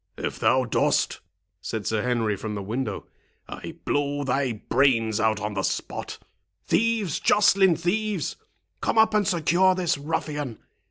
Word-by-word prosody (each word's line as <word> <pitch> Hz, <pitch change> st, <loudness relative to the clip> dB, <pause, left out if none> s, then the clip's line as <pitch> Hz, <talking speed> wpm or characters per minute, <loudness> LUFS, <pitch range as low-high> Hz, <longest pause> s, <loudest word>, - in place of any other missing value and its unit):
"If -, -, -4 dB
thou 130 Hz, 0 st, +3 dB
dost," 120 Hz, -, +1 dB, 0.4 s
said 110 Hz, -2 st, -4 dB
Sir 110 Hz, -1 st, 0 dB
Henry, 115 Hz, -3 st, 0 dB
from 105 Hz, +2 st, -5 dB
the 100 Hz, -, -4 dB
window, 110 Hz, 0 st, -3 dB, 0.4 s
"I -, -, -8 dB
blow 145 Hz, 0 st, 0 dB
thy 135 Hz, -1 st, 0 dB
brains 115 Hz, -1 st, +1 dB
out 110 Hz, -1 st, +2 dB
on 105 Hz, 0 st, -3 dB
the 95 Hz, -, -1 dB
spot. -, -, -3 dB, 0.5 s
Thieves, 225 Hz, -7 st, +1 dB
Joceline, 195 Hz, -3 st, +4 dB
thieves! 195 Hz, +2 st, -1 dB, 0.5 s
come -, -, 0 dB
up 220 Hz, 0 st, +5 dB
and 210 Hz, -2 st, +2 dB
secure 185 Hz, +1 st, +3 dB
this 175 Hz, -5 st, 0 dB
ruffian. 145 Hz, -4 st, -3 dB
140 Hz, 145 wpm, -25 LUFS, 110-185 Hz, 0.5 s, up